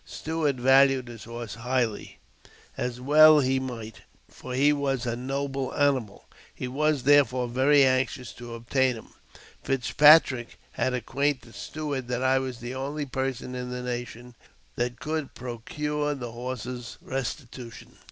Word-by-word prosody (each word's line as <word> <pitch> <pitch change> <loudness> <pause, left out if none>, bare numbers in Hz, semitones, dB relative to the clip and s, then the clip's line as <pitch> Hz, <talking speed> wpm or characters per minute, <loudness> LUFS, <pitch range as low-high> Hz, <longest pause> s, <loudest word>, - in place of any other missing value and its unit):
Stuart 155 -3 -2
valued 135 0 +4
his 115 -2 -10
horse 115 -1 -7
highly, 120 -1 -2 0.6
as 125 0 -3
well 155 +3 +7
he 130 -1 +1
might, 115 -4 -6 0.3
for 125 0 -8
he 145 +3 +4
was 135 -3 -1
a 120 -1 -1
noble 135 +1 -3
animal: 135 -8 0 0.3
he 125 - -5
was, 145 +1 0
therefore, 130 -3 +4
very 135 +4 +4
anxious 130 -2 0
to 120 -1 -9
obtain 125 +2 +1
him. 110 - -12 0.5
Fitzpatrick 135 -1 +4
had 130 - -1
acquainted 130 0 -2
Stuart 145 -5 -5
that 125 +1 -2
I 130 0 +3
was 130 -2 -4
the 120 +1 -5
only 140 +3 -3
person 130 -1 -3
in 125 0 -5
the 125 0 -5
nation 120 0 -6 0.4
that 120 0 -2
could 155 +1 -4
procure 145 +5 -3
the 120 -4 -6
horse's 125 -1 -6
restitution. 125 -2 -6
130 Hz, 140 wpm, -26 LUFS, 120-140 Hz, 0.6 s, well